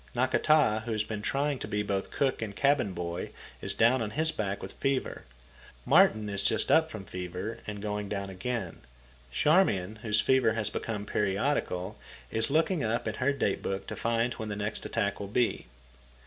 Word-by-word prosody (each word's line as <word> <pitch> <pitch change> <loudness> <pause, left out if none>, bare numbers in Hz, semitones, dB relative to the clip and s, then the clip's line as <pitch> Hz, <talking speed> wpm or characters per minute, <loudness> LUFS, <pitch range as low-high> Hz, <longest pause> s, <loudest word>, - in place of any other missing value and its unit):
Nakata, 130 -2 +3
who 120 - -3
has 110 -1 +1
been 105 -1 -5
trying 140 +4 0
to - - -5
be 105 0 -1
both 100 -1 -2
cook 135 -4 0
and 105 -3 -4
cabin 140 -6 +2
boy, 85 -1 -4 0.3
is - - +2
down 120 +3 +4
on 110 - -1
his 160 +8 +2
back 100 -5 -2
with - - -6
fever. 135 -1 -2 0.6
Martin 110 -1 +5
is 100 -1 0
just 110 +2 +1
up 160 0 +5
from 110 -7 -8
fever, 90 +4 -5
and 105 -1 -5
going 105 -1 -3
down 100 -1 -3
again. 95 0 -4 0.5
Charmian, 110 - +2
whose 105 -1 +1
fever 130 -3 +3
has 110 -2 -2
become 105 -3 -4
periodical, 100 -2 -1 0.3
is 110 +3 +2
looking 160 +3 +2
up 115 0 -1
in 110 - -1
her 130 +5 +1
date 140 -8 -1
book 95 0 -3
to - - -5
find 115 +1 0
when 110 -1 -6
the 105 - -3
next 105 +1 -2
attack 100 -3 -1
will 100 - -4
be. 115 - 0
110 Hz, 185 wpm, -29 LUFS, 100-130 Hz, 0.6 s, Martin